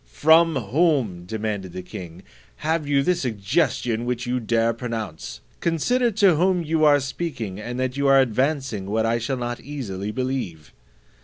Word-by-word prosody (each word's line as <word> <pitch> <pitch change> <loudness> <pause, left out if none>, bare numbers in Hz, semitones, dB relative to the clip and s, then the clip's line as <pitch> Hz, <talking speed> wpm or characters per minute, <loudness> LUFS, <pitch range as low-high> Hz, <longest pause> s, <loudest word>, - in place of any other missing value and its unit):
"From 160 - +5
whom," 125 - +1
demanded 105 -3 -4
the 90 - -6
king, 90 0 -9 0.4
"have 160 -1 0
you 140 -1 +2
the 180 - +3
suggestion 120 - 0
which 120 0 -2
you 125 +1 -1
dare 115 0 +1
pronounce? 110 - -6 0.2
Consider 240 - +1
to 195 -6 +4
whom 180 +1 +2
you 160 0 0
are 145 -1 +6
speaking, 130 - -4
and 120 +3 -5
that 130 0 -1
you 140 0 +1
are 135 0 +6
advancing 130 -4 0
what 110 +2 0
I 115 +1 +1
shall 130 +3 -2
not 120 -1 -4
easily 105 -9 -5
believe." 115 - -4
125 Hz, 160 wpm, -23 LUFS, 110-150 Hz, 0.4 s, are